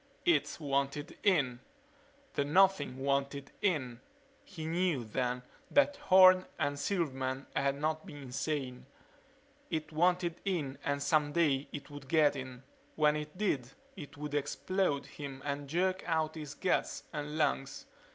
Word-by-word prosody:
It 150 -4 +2
wanted 140 0 -1
in 145 - +2 0.7
the 140 - +1
Nothing 150 -3 +3
wanted 140 +1 -1
in. 130 -11 0 0.4
He 165 -5 -8
knew, 165 -5 +1
then, 125 +2 -2 0.3
that 285 0 +3
Horne 185 -1 +7
and 145 -2 -1
Silverman 135 -6 -1
had 140 0 +1
not 155 +1 -1
been 145 - -9
insane. 130 0 -3 0.8
It 155 -1 -3
wanted 175 +1 +1
in 150 -9 -2
and 140 0 -1
someday 150 -2 +2
it 145 0 -8
would 145 -2 -9
get 150 -1 +4
in. 130 -1 -7 0.3
When 150 -1 +4
it 150 +3 -5
did 140 - 0 0.3
it 145 -7 -10
would 150 0 -5
explode 145 +2 0
him 135 -2 -8
and 140 -1 -3
jerk 185 +4 +1
out 160 -2 +1
his 150 -2 -7
guts 185 - 0
and 150 0 -4
lungs. 135 -3 0
145 Hz, 135 wpm, -32 LUFS, 140-165 Hz, 0.8 s, Horne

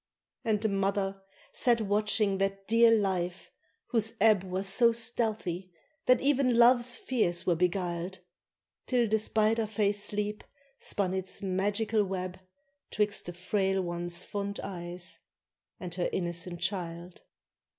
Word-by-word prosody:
And 220 -4 +1
the 220 - 0
mother 195 -1 -1 0.3
sat 240 -2 +3
watching 210 -1 +1
that 195 0 -2
dear 230 +1 +6
life, 190 -5 0 0.4
whose 225 -2 +1
ebb 210 -2 +5
Was 190 +1 -2
so 235 +4 +5
stealthy, 220 -6 -1 0.4
that 255 -1 +6
even 270 -3 +2
love's 240 +1 +6
fears 195 -12 0
were 175 - +3
beguiled, 180 +1 -1 0.7
Till 245 -2 +2
the 220 +1 +2
spider 220 +1 +2
fay 210 -1 +1
sleep 210 0 -3 0.4
spun 190 -2 -1
its 190 +1 -3
magical 205 +3 0
web 185 -1 -4 0.5
'Twixt 210 -3 0
the 175 - -5
frail 190 +1 0
one's 175 0 -3
fond 200 -1 -4
eyes 175 -1 -5 0.6
and 180 -2 -6
her 180 -1 -1
innocent 175 -1 -2
child. 175 -2 -4
195 Hz, 130 wpm, -29 LUFS, 180-220 Hz, 0.7 s, dear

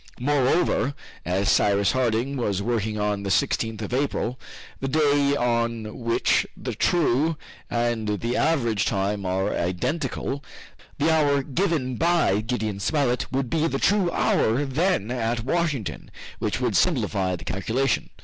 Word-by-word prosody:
Moreover, 140 +1 +1 0.3
as 95 +3 0
Cyrus 100 0 +3
Harding 130 +1 0
was 105 -7 -1
working 110 -1 -1
on 105 -1 0
the 100 - -4
16th 110 +4 0
of 105 - -5
April, 130 -2 -1 0.4
the 135 - -2
day 145 -1 +3
on 115 -3 -1
which 115 -1 +1
the - - -4
true 160 -1 +2 0.3
and 120 -2 -1
the 120 +2 -2
average 120 -10 +1
time 100 0 -1
are 95 +2 0
identical, 130 - -2 0.5
the 155 +3 +2
hour 145 -3 +2
given 140 -4 -1
by 165 - +2
Gideon 110 -3 -2
Spilett 125 0 0
would 135 0 -1
be 160 0 +2
the 135 - -1
true 200 +3 +2
hour 130 -3 +1
then 140 - 0
at 115 -2 -1
Washington, 150 - -2 0.3
which - - -1
would - - 0
simplify 95 -2 +1
the 90 - -10
calculation. 115 +7 -1
120 Hz, 140 wpm, -24 LUFS, 105-145 Hz, 0.5 s, Cyrus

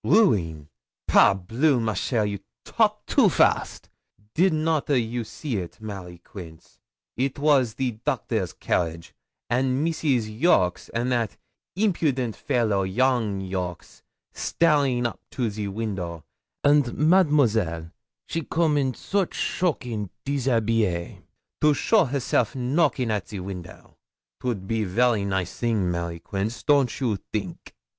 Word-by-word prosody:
'Rueen! 85 - +2 0.4
Par - - +6
bleu! 120 - +1
ma 110 -1 0
chère, 110 +3 0
you 100 -1 -3 0.3
talk - - +1
too - - +4
fast. - - +1 0.5
Did 185 +3 +4
not 155 -1 0
a 140 -3 +4
you 120 +1 -2
see 125 +1 -4
it, 85 -3 -6
Mary 95 -5 -7
Queence? 85 -2 -12 0.4
It 135 +2 -1
was 140 -6 +3
the 130 0 -1
doctor's 110 - -1
carriage, 85 +1 -2 0.3
and 130 +4 +1
Mrs. 130 -10 0
Jolks, 95 - +2
and 120 +2 -1
that 115 -4 -1 0.4
eempudent 150 - +1
faylow, 110 -5 +1
young 105 -1 0
Jolks, 90 -2 -5 0.3
staring 140 -7 +2
up 120 - -3
to 120 -4 -2
the 105 0 -4
window, 95 -6 -4 0.4
and 145 -3 +3
Mademoiselle 130 - +3 0.3
she 165 - -3
come 160 -2 +1
in 130 -2 0
soche 195 -3 -1
shocking 120 - -1 0.2
déshabille 115 -9 0 0.4
to 150 -1 +5
show 220 +9 +3
herself 135 -3 0
knocking 130 -1 +1
at 105 -3 -2
the 100 - -6
window. 90 -3 -9 0.4
'Twould 115 -7 -3
be 115 0 0
very 105 +2 +2
nice 95 -2 -2
thing, 110 -7 +1
Mary 85 -1 -3
Queence, 100 +6 -4
don't 140 -4 +3
you 120 -7 0
think?' - - -5
115 Hz, 130 wpm, -25 LUFS, 95-140 Hz, 0.5 s, Par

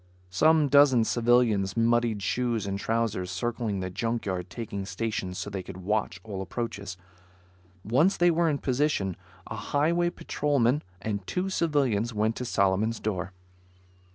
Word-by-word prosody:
Some 155 - +4
dozen 140 -4 +6
civilians 115 -4 +2
muddied 115 -2 +2
shoes 120 0 0
and 100 0 -3
trousers 110 -4 -1
circling 110 0 -2
the 95 0 -4
junk 115 +5 -2
yard, 90 -2 -3
taking 100 -3 -5
stations 95 -1 -3
so 105 - -5
they 95 -1 -3
could 95 0 -9
watch 95 -1 -1
all 100 -3 -5
approaches. 100 -2 -5 0.9
Once 145 - +3
they 175 0 +4
were 165 0 +2
in 145 - 0
position, 130 - 0 0.3
a - - -6
Highway 170 +4 +1
patrolman 145 -5 0 0.2
and 100 -3 -3
two 185 +1 -1
civilians 130 - +1
went 110 +2 +1
to 125 - -4
Solomon's 105 +1 +1
door. 95 -3 -3
115 Hz, 145 wpm, -27 LUFS, 100-130 Hz, 0.9 s, dozen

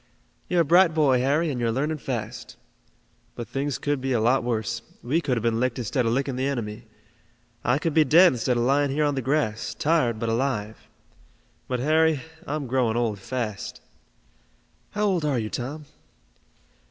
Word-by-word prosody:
"You're 175 -1 +3
a - - +1
bright 170 +1 +5
boy, 140 -5 +4
Harry, 145 +5 +1
and 125 - -3
you're 115 -1 +1
learning 150 +6 -1
fast. - - -5 0.8
But 120 - -6
things 135 +3 -2
could 145 -2 -1
be 135 0 -1
a 120 - +2
lot 125 +4 +2
worse. 115 -1 -2 0.2
We 150 +8 +1
could 130 -6 0
have 115 - -3
been 115 -1 +1
licked 125 -1 0
instead 120 +1 -1
of - - +1
licking 135 +1 -1
the 130 +1 0
enemy. 115 -6 -4 0.8
I 125 +2 +2
could 160 +1 -1
be 155 - +5
dead 170 +3 +6
instead 125 0 0
of 120 - +1
lying 140 +3 +2
here 150 +3 +1
on 145 - +1
the 135 - -2
grass, 130 -5 -1
tired 145 -8 +1
but 115 - -3
alive. 115 -3 -2 0.8
But, 125 -1 -2
Harry, 155 0 +3 0.3
I'm 150 -1 -2
growing 120 -3 +1
old 110 -4 -1
fast." 110 -2 -4 1.1
"How 210 0 -1
old 185 -5 +1
are 145 -4 +1
you, 110 -2 -3
Tom?" 145 +5 -5
130 Hz, 180 wpm, -25 LUFS, 120-150 Hz, 1.1 s, dead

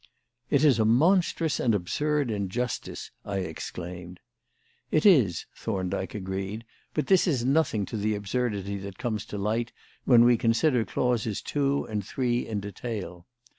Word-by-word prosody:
"It 140 0 +3
is 135 -7 +5
a - - +4
monstrous 160 - +3
and 115 -4 +2
absurd 145 +8 0
injustice," 105 +4 -3
I 100 -1 -3
exclaimed. 90 +1 -7 0.7
"It 155 - +1
is," 130 - +5
Thorndyke 95 -2 -3
agreed; 95 +3 -4 0.3
"but 150 - 0
this 190 -1 +4
is 130 -8 +1
nothing 135 -7 +2
to 110 - -5
the 105 +1 0
absurdity 100 -2 -2
that 100 -1 -8
comes 110 -3 -3
to 105 - -5
light 110 +4 -1 0.3
when 120 -2 +7
we 120 -1 +5
consider 120 +1 +2
clauses 115 -4 0
two 140 -1 0
and 105 -2 -3
three 120 +3 -1
in 105 -2 -2
detail. 100 -3 -6
110 Hz, 145 wpm, -27 LUFS, 100-130 Hz, 0.7 s, when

